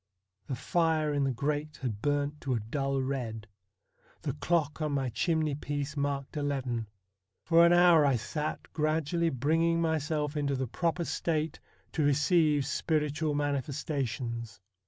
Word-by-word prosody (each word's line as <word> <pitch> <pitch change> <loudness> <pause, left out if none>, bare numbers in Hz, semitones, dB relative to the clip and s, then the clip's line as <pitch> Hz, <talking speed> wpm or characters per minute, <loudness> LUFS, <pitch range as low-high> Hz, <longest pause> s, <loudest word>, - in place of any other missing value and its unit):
The 135 - -2
fire 155 +1 +1
in 145 -1 +1
the 135 - +1
grate 145 +4 -2
had 110 -5 -3
burnt 145 +1 0
to 130 -3 -1
a - - 0
dull 135 +5 -1
red. 120 -5 -3 0.8
The - - -1
clock 160 -3 0
on 150 -1 0
my 135 -2 0
chimney 155 +5 0
piece 145 +1 -3
marked 140 -1 -2
eleven. 135 -6 -2 0.6
For 170 0 +6
an - - +4
hour 175 -3 +6
I 140 -2 +3
sat 150 +6 -4
gradually 160 +2 +1
bringing 165 +5 +2
myself 155 -2 0
into 140 -2 0
the 130 0 -1
proper 170 +7 -1
state 160 -2 -1 0.3
to 160 - -1
receive 150 0 +3
spiritual 150 +1 0
manifestations. 130 -6 -2
145 Hz, 140 wpm, -30 LUFS, 135-160 Hz, 0.8 s, For